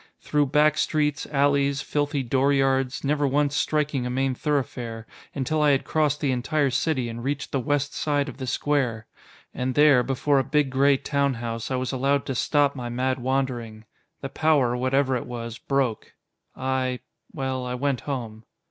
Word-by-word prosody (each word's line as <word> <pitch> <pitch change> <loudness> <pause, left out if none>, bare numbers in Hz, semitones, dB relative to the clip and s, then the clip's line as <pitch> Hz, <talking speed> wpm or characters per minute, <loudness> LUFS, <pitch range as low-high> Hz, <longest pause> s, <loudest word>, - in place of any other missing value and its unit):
Through 150 -1 +1
back 150 +2 +3
streets, 150 -2 0
alleys, 140 -1 +1
filthy 145 -1 -1
dooryards 135 0 +1
never 145 0 +1
once 145 +1 +1
striking 150 -2 0
a 125 - -3
main 135 +1 0
thoroughfare 125 -5 -3 0.3
until 150 +3 0
I 150 - +4
had 135 -2 +2
crossed 150 -2 0
the 140 - +1
entire 140 +3 0
city 130 -1 0
and 115 0 -6
reached 140 +2 -3
the 135 - 0
west 145 +3 -1
side 145 -1 0
of - - -8
the 130 -2 -5
square. 125 -5 0 0.5
And 130 0 -2
there, 145 -4 +6
before 135 +3 +1
a - - +1
big 145 0 +1
gray 135 +1 +4
town 140 0 0
house, 115 -1 -4
I 130 - -1
was 130 0 -2
allowed 140 +1 +1
to 135 - -2
stop 145 +3 +2
my 125 -2 -5
mad 130 +2 -1
wandering. 120 -4 -2 0.4
The 135 - -4
power, 140 -6 +2
whatever 130 +1 +1
it 125 - -4
was, 115 -1 -6
broke. 135 -5 -1 0.4
I 130 -1 -1 0.3
well, 130 -1 -3
I 125 - -3
went 135 0 -1
home." 115 -6 -5
135 Hz, 175 wpm, -25 LUFS, 125-145 Hz, 0.5 s, there